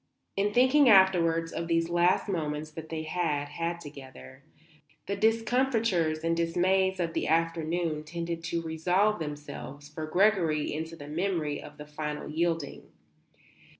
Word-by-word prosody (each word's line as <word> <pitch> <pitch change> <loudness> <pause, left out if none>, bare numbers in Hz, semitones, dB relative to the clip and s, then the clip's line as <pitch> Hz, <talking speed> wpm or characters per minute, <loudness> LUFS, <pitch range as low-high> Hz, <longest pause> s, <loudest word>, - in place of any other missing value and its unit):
In 200 +1 +1
thinking 260 +4 +5
afterwards 170 -5 +4
of 170 - -3
these 165 0 +1
last 175 +3 +2
moments 155 -4 -3
that 160 0 -9
they 160 -1 -4
had 155 -3 -1
had 170 +3 -3
together, 135 -3 -12 0.6
the 200 - -2
discomfitures 225 -7 +1
and 165 0 +1
dismays 185 +3 +1
of 165 -2 -1
the - - -1
afternoon 165 -1 0
tended 170 +1 -5
to 170 0 -2
resolve 180 +6 +1
themselves 145 -1 -7
for 155 +1 -6
Gregory 175 -4 +2
into 160 +2 -5
the 145 -3 -10
memory 160 -2 -2
of 150 - -12
the 150 - -9
final 150 0 -5
yielding. 165 -1 -2
165 Hz, 140 wpm, -28 LUFS, 155-185 Hz, 0.6 s, thinking